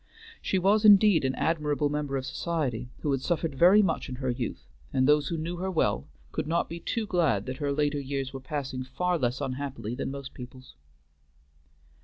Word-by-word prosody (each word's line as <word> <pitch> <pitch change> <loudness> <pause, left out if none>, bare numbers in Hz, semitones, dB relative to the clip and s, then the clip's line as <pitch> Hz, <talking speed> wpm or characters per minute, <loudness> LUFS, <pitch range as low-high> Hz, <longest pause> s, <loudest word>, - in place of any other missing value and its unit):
She 190 - 0
was 200 +4 +3
indeed 205 -5 +7
an 130 0 0
admirable 150 -2 0
member 145 -1 -2
of 130 - -4
society, 130 -5 -2
who 145 - 0
had 135 -2 0
suffered 165 -1 -1
very 180 +9 +6
much 165 -6 -1
in 130 - -4
her 130 0 -2
youth, 120 -1 -4 0.3
and 130 0 +2
those 150 -1 +4
who 165 - -2
knew 170 +3 -4
her 190 +2 -2
well 155 - 0 0.2
could - - -3
not 170 +2 +1
be 170 - -6
too 225 +6 -2
glad 160 - +1
that 130 0 -5
her 145 -2 -1
later 145 0 0
years 135 -1 -4
were 135 - -5
passing 130 -1 -4
far 175 +7 -1
less 125 +1 -1
unhappily 130 -4 -4
than 125 - -3
most 140 0 -7
people's. 130 0 -11
145 Hz, 195 wpm, -28 LUFS, 130-170 Hz, 0.3 s, indeed